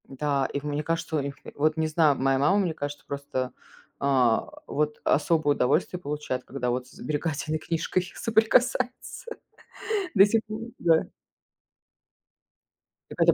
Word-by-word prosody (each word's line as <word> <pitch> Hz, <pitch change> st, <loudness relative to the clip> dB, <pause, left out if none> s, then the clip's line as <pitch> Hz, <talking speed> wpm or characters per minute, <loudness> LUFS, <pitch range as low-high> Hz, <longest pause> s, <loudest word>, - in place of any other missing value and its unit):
Да, 135 Hz, 0 st, 0 dB
и 140 Hz, -, -2 dB
в -, -, -16 dB
мне 150 Hz, 0 st, -2 dB
кажется, 165 Hz, +1 st, -2 dB
у -, -, +2 dB
них 140 Hz, 0 st, -4 dB, 0.2 s
вот 155 Hz, +2 st, +1 dB
не 160 Hz, 0 st, +1 dB
знаю, 155 Hz, -2 st, +3 dB
моя 135 Hz, +1 st, +2 dB
мама, 170 Hz, +8 st, +4 dB
мне 180 Hz, -5 st, 0 dB
кажется, 145 Hz, -1 st, -6 dB
просто, 140 Hz, -3 st, -3 dB, 0.5 s
э, 130 Hz, -5 st, +3 dB, 0.3 s
вот 150 Hz, 0 st, -1 dB
особое 150 Hz, -1 st, +2 dB
удовольствие 140 Hz, +8 st, +1 dB
получает, 145 Hz, -4 st, -3 dB
когда 125 Hz, -2 st, -3 dB
вот 125 Hz, +1 st, -2 dB
с -, -, -18 dB
сберегательной 155 Hz, +1 st, -2 dB
книжкой 170 Hz, +3 st, -1 dB
соприкасается. 245 Hz, -, +1 dB, 0.8 s
До 195 Hz, -2 st, +8 dB
сих 220 Hz, +2 st, +2 dB
пор, 215 Hz, 0 st, -5 dB, 0.2 s
да. 165 Hz, -1 st, +4 dB, 2.1 s
Так -, -, -5 dB
это -, -, +6 dB
150 Hz, 145 wpm, -26 LUFS, 140-165 Hz, 2.1 s, До